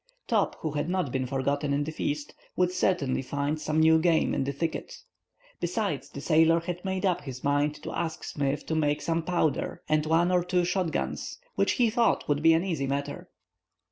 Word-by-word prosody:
Top, - - +1
who 155 - -2
had 145 +2 -2
not 180 -7 0
been 130 0 -1
forgotten 140 +2 0
in 145 +1 +1
the 155 - -4
feast, 145 -1 -3 0.2
would 180 0 +2
certainly 180 -8 +1
find 145 +3 -2
some 155 +1 0
new 160 0 +6
game 165 -1 +2
in - - 0
the 140 - -1
thicket. 160 +3 -3 0.6
Besides, - - -2
the - - -8
sailor 165 +1 +4
had 175 +1 -5
made 190 0 -2
up 180 -3 +1
his 130 -3 -8
mind 145 +1 +1
to - - -5
ask 165 -2 -3
Smith 140 0 -2
to - - -3
make 150 -2 +1
some 165 0 0
powder 165 -3 -1
and 155 0 +1
one 170 +3 +3
or 180 -1 +3
two 180 0 +1
shot 180 -1 0
guns, - - -3 0.2
which, - - +2
he 240 -4 +2
thought, 235 0 +2
would 145 0 +1
be 165 +1 +6
an 165 +2 +2
easy 160 -7 -1
matter. 140 +1 -3
160 Hz, 205 wpm, -28 LUFS, 145-175 Hz, 0.6 s, new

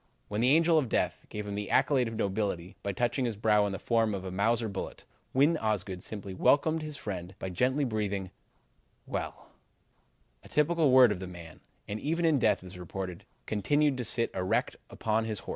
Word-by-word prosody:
"When 105 +2 -1
the 125 - +4
Angel 165 +2 +5
of 130 -6 -2
Death - - -1
gave 105 0 -5
him 100 - -4
the 105 0 -4
accolade 130 -5 +3
of 115 - -5
nobility 95 -4 -2
by 100 - -2
touching 120 +5 0
his 115 -3 -1
brow 105 0 +3
in - - -3
the 95 - -3
form 115 -2 +1
of 95 -1 -6
a 95 - -4
Mauser 115 +4 +1
bullet, 95 -2 -6 0.3
Win 145 +5 +4
Osgood 100 - -2
simply 100 -1 -7
welcomed 155 - +3
his 155 -1 -5
friend 90 -3 -6
by 95 - -5
gently 130 +10 +1
breathing 100 -6 -2 0.7
'Well,' - - -5 0.9
a - - -15
word - - -21
typical 150 -4 +5
of 105 -6 +1
the 95 - -6
man, 85 -3 -11 0.3
and 105 +1 -4
even 165 +6 0
in 155 -4 +4
death, - - +2
it - - -12
is 90 0 -9
reported, 90 0 -6 0.2
continued 145 +8 +2
to 125 - -2
sit 115 0 0
erect 95 0 0
upon 110 0 0
his 110 -3 -3
horse." - - -12
110 Hz, 200 wpm, -30 LUFS, 95-130 Hz, 0.9 s, Angel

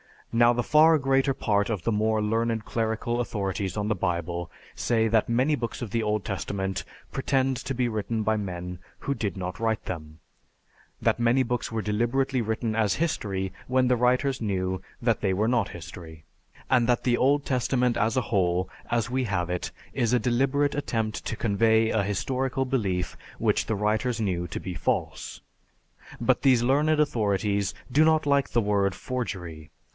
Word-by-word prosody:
"Now 120 +1 +5
the 120 0 0
far 155 +3 +6
greater 135 -1 +2
part 105 -4 0
of 105 -6 -2
the 115 - +1
more 110 0 +1
learned 115 +1 0
clerical 115 +1 -1
authorities 100 -5 -2
on 105 0 -1
the - - +3
Bible 85 -2 -2 0.2
say 115 -2 +1
that 110 0 +2
many 130 +6 +2
books 120 -2 -4
of 115 -5 -5
the 115 - 0
Old 105 -1 0
Testament 95 0 -3 0.3
pretend 135 -1 +1
to 135 - -4
be 125 -1 +1
written 110 0 -2
by 110 +1 +1
men 90 -3 -5 0.2
who 140 - -2
did 105 -8 -3
not 90 -1 -5
write 110 -1 -1
them; 80 -3 -6 0.8
that - - +2
many 120 +3 +3
books 125 0 -2
were 115 -1 -2
deliberately 120 +5 0
written 110 0 -2
as 110 -3 +2
history 100 - -1 0.2
when 130 0 +2
the 125 - +3
writers 125 +2 +2
knew 95 -3 -1 0.2
that 115 -2 +2
they 95 -2 +1
were 105 +4 +1
not 115 -4 +1
history; 80 -2 -10 0.5
and 120 -3 +3
that 120 -1 +2
the 120 -1 +2
Old 140 +2 +2
Testament 125 -1 +1
as 110 +1 +1
a 130 - +3
whole, 90 -3 +1 0.2
as 120 0 0
we 130 0 0
have 90 -5 -1
it, 90 0 -2 0.2
is 120 0 +1
a - - +5
deliberate 135 +5 +1
attempt 115 -7 -2
to - - -2
convey 110 +1 +2
an 105 -3 +1
historical 130 +6 -1
belief 100 -9 -1 0.2
which - - +1
the 110 - -1
writers 110 +4 0
knew 90 -4 -1
to - - -5
be 95 - -5
false. 85 - -2 0.8
But - - +2
these 125 -3 +4
learned 150 +5 +3
authorities 100 -6 0 0.2
do 150 +5 +5
not 160 -1 +3
like 140 -1 +2
the 120 - +3
word 100 -2 +1
forgery. 90 -11 -5
115 Hz, 175 wpm, -26 LUFS, 100-125 Hz, 0.8 s, far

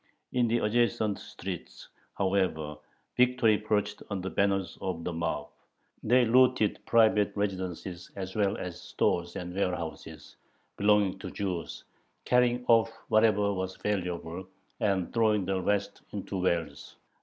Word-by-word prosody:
In 125 -1 +3
the 115 +1 +2
adjacent 110 -2 +1
streets, 90 -2 -8 0.3
however, 95 -6 0 0.4
"victory" 125 -4 +4
perched 105 -1 -1
on 100 -2 -2
the 95 +1 -4
banner 100 -1 +2 0.2
of 90 -3 -3
the 90 - -3
mob. 80 -3 -2 0.5
They 125 +2 +4
looted 125 -2 +3
private 110 -3 +4
residences 95 -3 -3
as 95 -1 -6
well 100 -2 +1
as 90 -1 -6
stores 85 0 -1
and 90 0 -5
warehouses 90 -4 -4 0.4
belonging 100 -2 +3
to - - -6
Jews, 95 -4 -4 0.4
carrying 125 0 +3
off 115 -1 +5 0.2
whatever 105 -2 +4
was 95 0 -3
valuable, 90 -3 -3 0.3
and 100 -5 0
throwing 110 -4 +2
the 95 0 -1
rest 100 +2 -1
into 100 -1 -4
wells. 85 -5 -2
100 Hz, 130 wpm, -29 LUFS, 90-110 Hz, 0.5 s, off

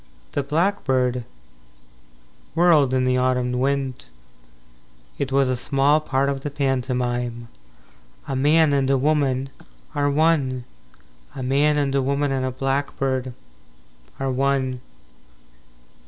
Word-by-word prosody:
III - - -32
The 145 - -1
blackbird 130 - +1 1.3
whirled 165 -6 +4
in 130 -1 +1
the 125 0 +2
autumn 125 -1 +1
wind 135 - -1 1.1
It 135 -1 -2
was 135 0 +3
a 130 - 0
small 140 +4 +2
part 140 -3 0
of 140 -1 -2
the 145 - -3
pantomime. 125 -4 -2 0.7
IV - - -15
A 135 - -1
man 150 +3 +4
and 135 -1 +1
a 135 - +3
woman 135 -2 0 0.4
Are 145 0 +1
one. 140 -4 +1 0.7
A 130 - -5
man 145 +3 +2
and 140 -2 0
a 140 - +2
woman 140 +1 0
and 135 -1 -1
a 130 - 0
blackbird 135 -1 -2 0.8
Are 135 -1 -1
one. 130 -1 0
135 Hz, 125 wpm, -22 LUFS, 130-140 Hz, 1.3 s, whirled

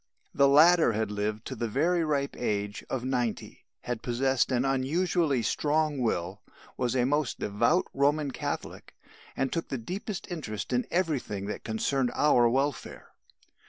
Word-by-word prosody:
The 140 0 +4
latter 155 -1 +6
had 110 0 -1
lived 105 +1 -3
to 130 - -5
the 115 0 -2
very 165 +9 +1
ripe 140 -3 -1
age 105 -3 -2
of 130 -1 -3
ninety, 125 -4 -3 0.2
had 120 -2 -4
possessed 130 +2 +1
an 125 +1 +1
unusually 140 +1 +1
strong 150 +4 0
will, 100 -4 -2 0.3
was 125 0 -1
a 125 -1 +2
most 145 0 0
devout 115 - +1
Roman 145 +1 +1
Catholic, - - -5 0.4
and 135 0 -1
took 165 - -2
the 135 - -3
deepest 190 - -5
interest 125 -9 -5
in 125 0 0
everything 145 - -1
that 105 - -5
concerned 125 +4 0
our 120 -5 +4
welfare. 135 +2 -2
130 Hz, 150 wpm, -28 LUFS, 115-150 Hz, 0.4 s, latter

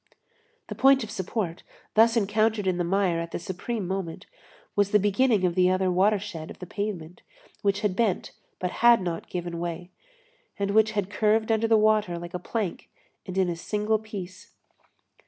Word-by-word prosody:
The - - -5
point 270 -1 +4
of 215 - -7
support, 190 -3 -3 0.3
thus 225 +2 +5
encountered 215 0 +1
in 185 -2 +1
the - - +1
mire 180 -1 +1
at 170 0 -4
the - - -4
supreme 190 +4 -4
moment, 190 -3 -4 0.5
was 205 -1 +3
the 210 - +5
beginning 205 0 +2
of 175 - +1
the 180 +1 +3
other 185 0 +1
watershed 190 -3 0
of - - -10
the 180 - -8
pavement, 180 -4 -5 0.4
which 200 0 +1
had 205 -4 0
bent 210 -4 0 0.3
but 180 -1 -3
had 235 0 +7
not 170 -2 -4
given 175 -1 -4
way, 175 +1 -5 0.7
and 200 0 -1
which 215 +1 +3
had 205 -2 -2
curved 220 +2 +2
under 225 0 +2
the 225 -1 +5
water 215 -4 +2
like 170 +1 -8
a 180 - -3
plank 205 0 -4 0.4
and 185 0 -5
in 190 -1 +3
a 175 - -2
single 210 +5 -1
piece. 190 -4 -9
200 Hz, 180 wpm, -26 LUFS, 180-215 Hz, 0.7 s, had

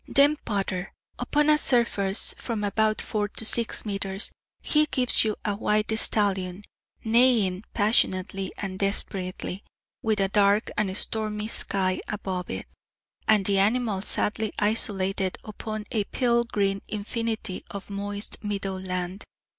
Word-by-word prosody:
Then 285 +2 +5
Potter. 195 -3 -2 0.3
Upon 295 0 +2
a 305 0 +5
surface 230 -7 +2
from 225 -4 -3
about 215 +1 +1
four 210 -1 -1
to 225 - -3
six 230 +1 +3
metres 195 -1 -2 0.3
he 300 0 +3
gives 255 -3 +4
you 215 -2 0
a 205 -1 0
white 215 +1 +1
stallion, 195 -3 +1 0.4
neighing 220 -5 +3
passionately 195 -3 +1
and 190 -2 -5
desperately, 195 -1 -2 0.4
with 220 -2 +1
a 195 - +3
dark 205 +1 +3
and 195 -2 0
stormy 215 -1 -2
sky 190 -4 0
above 190 -3 -4
it, - - -4 0.6
and 210 -3 +4
the 195 0 +3
animal 215 -1 +2
sadly 210 +1 +1
isolated 195 -3 0
upon 215 0 -6
a 215 -3 +1
pale 235 0 +1
green 200 -3 0
infinity 220 -1 -3
of 200 0 -8
moist 205 +2 -4
meadow 195 -2 -3
land. 185 +1 -4
205 Hz, 130 wpm, -26 LUFS, 195-220 Hz, 0.6 s, Then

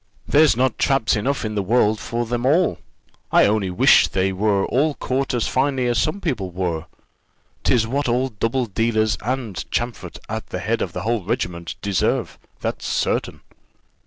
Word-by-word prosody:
there's 150 -4 +4
not 130 -1 +1
traps 135 -5 +2
enough 125 +4 -1
in 110 - -3
the 105 - 0
world 110 +1 +2
for 120 +3 -3
them 120 +1 -2
all; 160 +7 +2 0.5
I - - +6
only 100 -2 +1
wish 90 - +5
they 95 0 0
were 100 0 +1
all 145 +3 +1
caught 135 +1 -1
as 120 - 0
finely 130 -1 +1
as 120 -1 +1
some 155 - 0
people 125 - -2
were. 85 -3 -3 0.8
"Tis 115 -2 +3
what 135 +3 -1
all 125 +3 +1
double 115 +3 -1
dealers, 110 0 +1
and 115 -7 -3
Champfort 120 -1 -3
at - - -5
the - - -5
head - - -1
of - - -3
the - - -4
whole 115 -2 0
regiment, 85 -3 -3
deserve 100 -3 0 0.2
that's - - -3
certain." - - -1
115 Hz, 170 wpm, -21 LUFS, 100-130 Hz, 0.8 s, I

